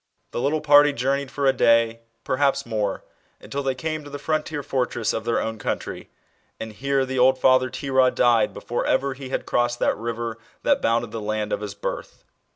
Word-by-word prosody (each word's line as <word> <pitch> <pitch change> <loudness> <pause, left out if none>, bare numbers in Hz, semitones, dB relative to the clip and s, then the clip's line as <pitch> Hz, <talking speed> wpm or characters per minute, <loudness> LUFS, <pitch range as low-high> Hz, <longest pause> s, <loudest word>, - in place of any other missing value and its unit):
The - - -3
little 150 +3 0
party 145 -1 +6
journeyed 140 +2 -1
for 140 +1 -2
a 135 - +5
day, 115 -2 +3 0.2
perhaps 140 +1 +1
more, 105 -4 -2 0.4
until 140 - -5
they 135 -1 -1
came 155 +2 -4
to 145 - -10
the 145 - -6
frontier 155 -1 -2
fortress 125 -4 -1
of 110 - -4
their 115 - +1
own 110 -1 -3
country - - -4
^ - - -35 0.5
and 110 -1 -6
here 135 +4 0
the 130 0 -3
old 130 +1 +5
father 130 0 +4
Terah 130 -1 +2
died 120 -3 +3
before 120 - -3
( - - -2
ever 140 0 +1
he 130 0 -9
had - - -2
crossed 120 0 0
that - - +1
river 115 0 -4 0.2
that - - +2
bounded 115 -1 +1
the 115 - -5
land 105 0 -2
of - - -2
his 100 -1 -6
birth. 100 - -6
130 Hz, 205 wpm, -23 LUFS, 115-140 Hz, 0.5 s, party